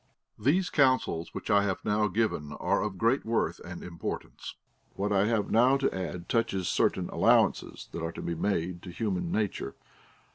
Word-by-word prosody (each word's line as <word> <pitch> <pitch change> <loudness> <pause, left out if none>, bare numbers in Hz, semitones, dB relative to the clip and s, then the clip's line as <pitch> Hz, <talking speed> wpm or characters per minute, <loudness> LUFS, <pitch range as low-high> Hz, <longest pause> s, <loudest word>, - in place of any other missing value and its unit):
These 165 - +2
counsels 130 - +2
Λvhich - - -5
I 100 -1 +5
have 95 -2 -2
now 105 0 +2
given 90 -8 -1
are - - 0
of 105 -3 -3
great 115 +7 +2
worth 115 +1 0
and - - -8
importance; 85 -1 -6 0.4
Avhat 100 +1 -1
I 100 0 +3
have 110 -3 0
now 125 +4 +5
to 135 -6 0
add 90 -2 -5
touches 105 -6 0
certain - - +1
allowances - - +2
that 85 - -5
are 80 0 -2
to - - -7
be 85 - -2
made 85 0 -1
to 90 - -9
human 90 -3 -2
nature. 105 -9 -2
100 Hz, 175 wpm, -29 LUFS, 90-115 Hz, 0.4 s, I